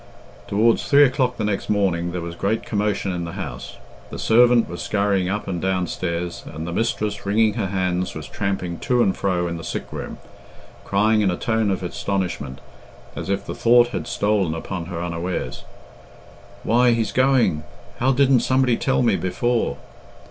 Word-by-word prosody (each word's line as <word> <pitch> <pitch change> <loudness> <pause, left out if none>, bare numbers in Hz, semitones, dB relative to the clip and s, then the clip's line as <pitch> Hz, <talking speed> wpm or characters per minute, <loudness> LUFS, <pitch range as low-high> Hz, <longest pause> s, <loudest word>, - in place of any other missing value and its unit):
Towards 110 +3 +3
three 145 0 +7
o'clock 130 -2 +1
the 110 - -2
next 105 -2 -2
morning 90 -4 +1
there 90 0 -4
was 85 0 -5
great 100 +6 -1
commotion 105 -2 -1
in 90 -1 -3
the 85 - -6
house. - - -7 0.3
The - - -7
servant 120 +1 +4
was 85 - -6
scurrying 100 -3 +1
up 105 +2 -3
and 90 -3 -3
downstairs, 90 -2 -2
and 80 +1 -6
the 85 - -4
mistress, 105 -1 -1
wringing 105 +2 +2
her 110 -3 -2
hands, 90 -1 -1
was 80 -2 -6
tramping 95 -5 -3
to 125 -1 +2
and 95 - +1
fro 90 -3 0
in 85 0 -4
the 80 - -8
sick - - -5
room, - - -6 0.7
crying 105 +2 +2
in 100 - +2
a 90 - -1
tone 110 -2 0
of 95 -1 -1
astonishment, 90 -7 -3 0.5
as - - -5
if 100 0 -1
the - - -5
thought 120 +1 +4
had - - -4
stolen 100 -6 0
upon 85 +1 -5
her 85 -2 -4
unawares, 85 +1 -4 1.0
"Why, 120 +1 +4
he's 115 -3 0
going! 130 - +3 0.4
How 130 +2 +3
didn't 135 -1 +4
somebody 130 -1 +2
tell 130 -1 +1
me 115 -5 +3
before?" 120 +6 0
100 Hz, 175 wpm, -22 LUFS, 90-115 Hz, 1.0 s, three